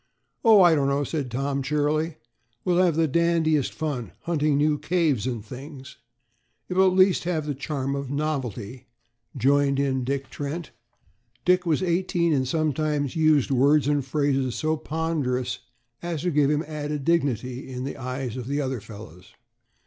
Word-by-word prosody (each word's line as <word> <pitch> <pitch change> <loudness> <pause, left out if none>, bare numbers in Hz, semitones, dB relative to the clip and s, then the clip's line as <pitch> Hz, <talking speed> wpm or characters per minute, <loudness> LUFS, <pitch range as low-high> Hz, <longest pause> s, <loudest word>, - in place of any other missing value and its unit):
"Oh, 220 -5 +7
I 175 -2 +6
don't 140 -3 +2
know," 140 +1 +1
said 145 -2 -3
Tom 135 +3 -2
cheerily; 150 +3 0 0.5
"we'll 180 0 +3
have 170 -4 +2
the 160 0 +2
dandiest 160 -2 +2
fun, 145 -7 -4
hunting 155 -4 +1
new 150 0 +2
caves 155 - +1
and 115 -4 -4
things." 135 +3 -10 0.7
"It - - -2
will 190 0 +5
at 185 0 +1
least 185 -2 +4
have 165 -4 -1
the 145 - -2
charm 140 0 -3
of 140 -2 -4
novelty," 130 -5 -3 0.5
joined 140 +2 +3
in 135 -2 0
Dick 135 +1 -3
Trent 150 +3 -5 0.7
Dick 180 0 +3
was 160 +2 +1
eighteen 175 -2 +1
and 130 -2 +1
sometimes 150 -1 0
used 155 -4 +3
words 140 +2 +4
and 145 -1 +1
phrases 135 -2 0
so 155 0 0
ponderous 150 -6 -2 0.4
as 170 -3 -4
to 180 - +1
give 145 -2 +3
him 150 +1 +1
added 150 -2 -4
dignity 130 -6 0
in 125 0 -5
the 140 - -4
eyes 130 -2 -4
of 125 -2 -6
the 140 +2 -1
other 130 -5 -2
fellows. 95 -5 -12
145 Hz, 165 wpm, -25 LUFS, 130-160 Hz, 0.7 s, Oh